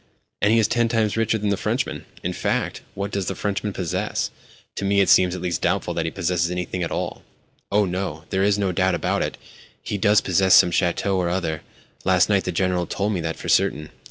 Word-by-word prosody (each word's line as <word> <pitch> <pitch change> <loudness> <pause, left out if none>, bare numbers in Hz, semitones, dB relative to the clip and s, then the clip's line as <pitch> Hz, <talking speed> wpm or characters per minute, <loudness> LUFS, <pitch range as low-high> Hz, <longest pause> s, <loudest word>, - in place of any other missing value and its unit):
"And 105 - +4
he 115 - +4
is 110 -1 +4
ten 120 0 +1
times 110 -3 +1
richer 115 0 +1
than 105 -1 -1
the 100 - +1
Frenchman. - - -2 0.2
In - - -2
fact, - - -2
what 100 +1 -3
does 100 -2 -2
the 95 - -2
Frenchman 105 +2 -2
possess? 90 -4 -2 0.5
To - - -3
me 100 0 +2
it 100 - +3
seems 90 -1 +5
at 90 - -6
least 90 -2 -1
doubtful 90 0 0
that 80 -1 -2
he 80 - -2
possesses 85 0 0
anything 90 0 -3
at 85 - -1
all." - - -4 0.5
"Oh, 105 +1 +3
no, 90 -4 -3
there 95 - +1
is 100 +1 +3
no 100 -2 0
doubt 95 +1 +1
about - - -1
it. - - -3 0.5
He 105 - -3
does 105 +2 +5
possess 95 0 +4
some 90 - +6
château 90 +2 +1
or 90 -2 0
other. 85 -3 -2 0.4
Last 95 0 +3
night 100 -2 +2
the 90 - -1
General 90 0 0
told 105 +2 -1
me 90 - -2
that 80 0 -3
for - - -8
certain. 75 +1 +2
95 Hz, 225 wpm, -23 LUFS, 90-100 Hz, 0.5 s, some